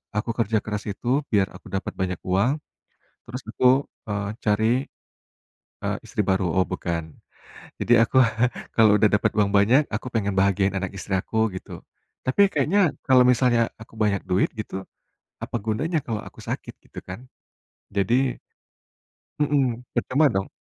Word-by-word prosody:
aku 105 +2 -1
kerja 110 -2 +1
keras 105 -1 -3
itu 100 - -9 0.2
biar 100 -3 +3
aku - - -13
dapat 95 - -3
banyak 90 -2 -2
uang, 100 +8 +2 0.7
terus 125 +2 -6
aku, 130 +2 +3 0.2
eee, 100 0 -2
cari, 110 +1 +2 1.1
eee, - - -1
istri - - -1
baru, 95 0 +2
oh 95 0 +3
bukan, 85 -3 -4 0.7
jadi 115 -1 +5
aku 130 - -1 0.6
kalau 110 -2 +6
udah 105 0 +4
dapat 105 -1 +2
uang 105 -1 +3
banyak, 120 +9 +5
aku 110 - -5
pengen 100 -3 0
bahagiain 100 0 +2
anak 95 -1 -3
istri 95 - -5
aku 110 +3 0
gitu. 95 - -8 0.5
Tapi 130 +10 +2
kayaknya 155 +7 +2 0.3
kalau 130 -2 +6
misalnya 125 -1 +3 0.2
aku 110 - -13
banyak 100 -2 +1
duit 95 +1 +2
gitu, 105 - -5 0.7
apa - - -3
gunanya 150 +10 0
kalau 110 -3 -2
aku - - -16
sakit, - - -4
gitu - - -13
kan. 90 +4 -6 0.8
Jadi 120 +7 +2 1.0
mhm, 135 -5 +1
percuma 145 +4 +2
dong. 95 0 -1
110 Hz, 150 wpm, -24 LUFS, 100-125 Hz, 1.1 s, kalau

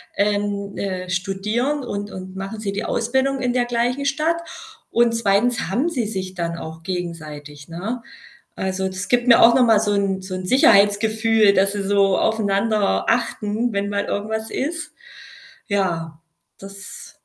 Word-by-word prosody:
ähm, 205 0 -1
äh, 185 -2 -4
studieren 210 +10 -1
und 205 -3 -4
und 185 0 -9
machen 195 +3 -6
sie 200 -2 -2
die 205 +3 -3
Ausbildung 265 +3 0
in 250 -1 0
der 245 -1 +1
gleichen 245 +3 -1
Stadt 310 +4 +1 0.5
und 235 0 +3
2. 225 -1 +1
haben 265 - +1
sie 250 -9 -2
sich 190 -3 -5
dann 170 -1 -3
auch 160 0 -8
gegenseitig, 155 -5 -6
ne? 205 +9 -5 0.5
Also, 190 0 -2
das 190 +1 -5
gibt 245 0 +2
mir 235 - +7
auch 235 - +8
noch 250 - +5
mal 220 -2 +5
so 205 -1 0
'n 195 -2 0
so 185 0 -6
'n 185 0 -5
Sicherheitsgefühl, 220 -1 +4
dass 195 +1 +2
sie 200 -1 -3
so 195 -1 +3
aufeinander 215 -1 +1
achten, 230 -1 0
wenn 200 0 -1
mal 200 0 -1
irgendwas 220 +2 -3
ist. 325 +4 -4 0.7
Ja, 165 -6 -1 0.4
das 195 +1 -11
205 Hz, 155 wpm, -21 LUFS, 190-235 Hz, 0.7 s, auch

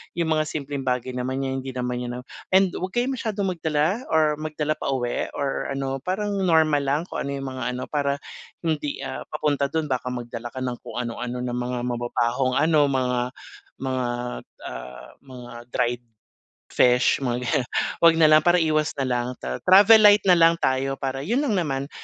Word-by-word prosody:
yung 170 -2 0
mga 155 - +2
simpleng 145 -2 -4
bagay 125 0 -1
naman 130 +1 -2
niya 135 - -2
hindi 135 0 -5
naman 125 -1 -2
niya 125 0 -5 0.3
and 190 -1 +5
'wag 185 +1 -4
kayo 240 +1 +1
masyadong 210 -6 -2
magdala 160 +7 0
or 155 -1 +3
magdala 155 -1 -2
pauwi 125 -3 -1
or 140 -1 -2
ano 135 -1 -3
parang 200 +5 -2 0.2
normal 160 -3 +4
lang 140 +2 0
kung - - -5
ano - - -3
yung 135 - -5
mga 130 -1 -5
ano, 125 - -4
para 140 -2 0 0.5
hindi, 150 -4 -2
ah, - - -5
papunta 145 -2 0
dun 160 0 0
baka 130 -1 -2
magdala 120 -1 -6
ka 130 -1 -4
ng 125 -1 -3
kung - - -9
ano-ano 125 +1 -4
ng 125 -1 -3
mga 125 0 -3
mababahong 120 +1 0
ano, 155 0 +4
mga 125 -2 0 0.6
mga 130 -1 -1 0.4
at, - - -27 0.2
ah, 60 0 -9
mga 125 -3 -11 0.2
dried 120 0 -1 0.7
fish, 125 0 +4
mga 120 -3 -1
ganiyan, 125 +1 0 0.3
huwag 165 -1 +6
nalang 155 -1 +6
para 175 0 +5
iwas 155 -1 +1
nalang. 125 -2 -1
Ta - - -3
travel 205 +4 +8
light 205 0 +7
na 180 - +7
lang 165 0 +6
tayo 130 +1 +1
para 135 0 -3
yun 240 - +1
lang 235 -9 0
naman. 140 -5 -2
140 Hz, 180 wpm, -24 LUFS, 125-160 Hz, 0.7 s, travel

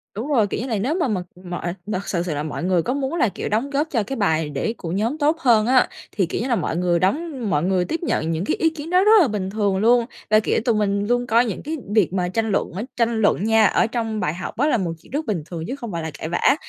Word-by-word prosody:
Đúng 225 +6 -4
rồi, 245 -9 +3
kiểu 205 - -3
như 250 - -4
là, 225 -4 -1
nếu 255 +11 0
mà 345 -6 +1
mà 205 -6 -1 0.2
mọi 175 -1 -4
mà 210 -2 -2
thực 200 - -9
sự 175 -3 -1
sự 175 -3 -3
là 145 - -2
mọi 155 - -5
người 180 -2 +2
có 250 - -1
muốn 275 0 -2
là, 245 -9 +2
kiểu, - - -5
đóng 225 +6 0
góp 290 +3 0
cho 230 -6 +1
cái 270 +6 -5
bài 160 -7 +1
để 145 +10 -2
của 165 - -5
nhóm 220 - -1
tốt 310 +2 +2
hơn 230 -7 +4
á, 255 0 +4 0.2
thì, 195 - +1
kiểu 170 - -3
như 245 - -2
là, 245 - +2
mọi 170 -4 -2
người 175 -1 +2
đóng 265 - -1
mọi 150 -3 +1
người 185 0 +1
tiếp 325 - -2
nhận 165 - 0
những 165 +3 -2
cái - - 0
ý 325 - +2
kiến 320 0 -8
đó 365 +2 +4
rất 425 - +5
là 320 - +4
bình 205 -4 -3
thường 200 -2 0
luôn. 235 +3 +4 0.2
Là, 215 0 +6
kiểu, 220 - 0
tụi 235 - +3
mình 200 -1 0
luôn 245 +1 +1
coi 235 +1 +4
những 215 -6 -4
cái 315 +2 -3 0.2
việc 200 -5 +3
mà 180 -2 0
tranh 225 +4 -1
luận 195 - 0
ấy 195 +7 -4
tranh 230 -1 +1
luận 205 -2 +2
nha, 220 -1 +4
ở 225 - +3
trong 225 -2 -2
bài 180 -6 -1
học 180 +2 -7
á 285 +5 +2
là 300 - +3
một 180 -5 -2
chuyện - - -20
rất 295 +4 -2
bình 190 - -2
thường 165 -1 -6
chứ 260 - -3
không 235 -6 -7
phải 170 -2 -3
là 160 - -4
cãi 160 - -4
vã. 175 +10 +3
215 Hz, 305 wpm, -22 LUFS, 185-250 Hz, 0.2 s, Là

